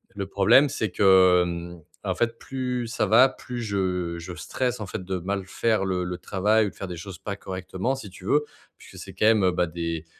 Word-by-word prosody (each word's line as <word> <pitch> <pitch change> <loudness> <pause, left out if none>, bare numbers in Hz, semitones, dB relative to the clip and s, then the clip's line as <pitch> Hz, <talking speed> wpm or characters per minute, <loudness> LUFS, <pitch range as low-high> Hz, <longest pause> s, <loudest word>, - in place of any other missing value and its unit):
Le 100 -1 -4
problème, 100 +9 +5
c'est 110 -6 -2
que, 95 -2 +5
mmh, 85 0 -5 0.3
en - - -1
fait, 115 -1 -1
plus 125 -2 -3
ça 115 - 0
va, 115 +6 +6
plus 125 -2 -7
je 90 -5 -2
je 90 +2 -7
stresse 125 +7 -3
en 105 - -4
fait 95 - -5
de 95 0 -3
mal 95 +2 -3
faire 110 +2 0
le 90 -2 -1
le 90 0 -4
travail 105 +4 +1
ou - - -3
de - - -18
faire 95 - -6
des 90 - -6
choses 90 +2 -8
pas 100 - -5
correctement 95 +5 -3
si 110 -7 -9
tu 90 0 -14
veux, 150 +8 +2 0.3
puisque - - -14
c'est - - -11
quand - - 0
même, 110 -2 +5
heu, 90 - +4
bah, 90 0 0
des 85 -1 -4
95 Hz, 230 wpm, -25 LUFS, 90-115 Hz, 0.3 s, va